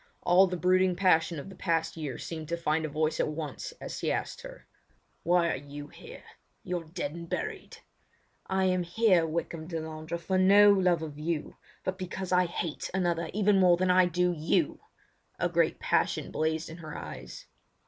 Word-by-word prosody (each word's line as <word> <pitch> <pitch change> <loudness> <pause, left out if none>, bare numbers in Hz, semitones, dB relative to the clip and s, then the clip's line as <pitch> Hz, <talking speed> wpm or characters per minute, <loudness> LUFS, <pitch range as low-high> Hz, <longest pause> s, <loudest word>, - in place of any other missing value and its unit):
All 185 +2 +6
the 180 0 -3
brooding 185 +1 +3
passion 170 -3 +3
of 140 - -7
the 195 - -10
past 165 -3 -1
year 150 -6 -5
seemed 160 -2 -6
to 170 - -1
find 160 -1 0
a - - -3
voice 155 +1 -1
at - - +2
once 155 -1 -5
as - - -6
he - - 0
asked - - -3
her: - - -11 0.6
"Why 175 -1 +3
are - - -1
you 145 +1 -9
here? - - -12 0.4
You're 175 -2 -3
dead 160 -2 -4
and 170 0 -8
buried." 435 -2 -4 0.7
"I 190 0 +1
am 185 -1 +2
here, 175 -1 +3
Wykham 160 0 -4
Delandre, 160 0 -5
for 185 +2 0
no 200 +2 +7
love 180 -4 +2
of 150 -2 -7
you, 155 0 -3 0.3
but 185 +1 -3
because 185 0 -5
I 180 0 +4
hate 170 -2 -4
another 170 -3 0
even 205 -1 +3
more 180 -2 +5
than 185 +1 +2
I 180 0 +5
do 180 +1 +1
you!" 155 +1 0 0.6
A - - +1
great - - +1
passion - - 0
blazed 160 +1 -1
in 160 - -9
her 155 -3 -8
eyes. - - -8
170 Hz, 185 wpm, -29 LUFS, 160-185 Hz, 0.7 s, no